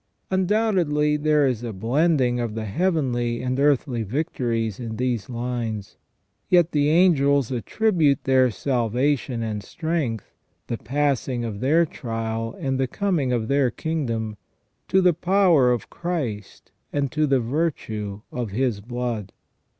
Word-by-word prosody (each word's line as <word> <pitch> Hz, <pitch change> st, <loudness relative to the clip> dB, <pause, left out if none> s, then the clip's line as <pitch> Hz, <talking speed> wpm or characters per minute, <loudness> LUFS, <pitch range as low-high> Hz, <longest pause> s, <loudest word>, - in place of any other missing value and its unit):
Undoubtedly 185 Hz, -7 st, +2 dB
there 150 Hz, -1 st, +3 dB
is 125 Hz, -4 st, 0 dB
a 120 Hz, -1 st, -4 dB
blending 125 Hz, -, +1 dB
of 115 Hz, -3 st, -3 dB
the 110 Hz, -1 st, -3 dB
heavenly 120 Hz, -, 0 dB
and 130 Hz, +1 st, -1 dB
earthly 140 Hz, -4 st, +2 dB
victories 115 Hz, -, -2 dB
in 115 Hz, -2 st, -5 dB
these 125 Hz, -2 st, -2 dB
lines; 120 Hz, -4 st, -4 dB, 0.5 s
yet 175 Hz, -2 st, +4 dB
the 145 Hz, -1 st, +2 dB
angels 140 Hz, -6 st, +4 dB
attri 210 Hz, -, 0 dB
bute 145 Hz, -4 st, +3 dB
their 130 Hz, -1 st, +4 dB
salvation 125 Hz, +2 st, 0 dB
and 105 Hz, -2 st, -3 dB
strength, 155 Hz, -, -3 dB, 0.3 s
the 115 Hz, -, -3 dB
passing 130 Hz, -2 st, -1 dB
of 105 Hz, -3 st, -5 dB
their 155 Hz, +7 st, +3 dB
trial 115 Hz, -5 st, -4 dB
and 135 Hz, -1 st, -1 dB
the 130 Hz, -, +1 dB
coming 170 Hz, -5 st, 0 dB
of 115 Hz, -3 st, 0 dB
their 140 Hz, -1 st, +2 dB
kingdom, 115 Hz, -7 st, -3 dB, 0.5 s
to 190 Hz, -, +3 dB
the 180 Hz, -1 st, +4 dB
power 175 Hz, -6 st, +4 dB
of 120 Hz, -, -2 dB
Christ 145 Hz, -, -4 dB, 0.2 s
and 140 Hz, -2 st, -1 dB
to 155 Hz, +2 st, +1 dB
the 135 Hz, -2 st, +3 dB
virtue 115 Hz, -7 st, -2 dB
of 120 Hz, -3 st, -3 dB
His 115 Hz, 0 st, 0 dB
blood. 120 Hz, -3 st, -4 dB
130 Hz, 140 wpm, -24 LUFS, 115-155 Hz, 0.5 s, yet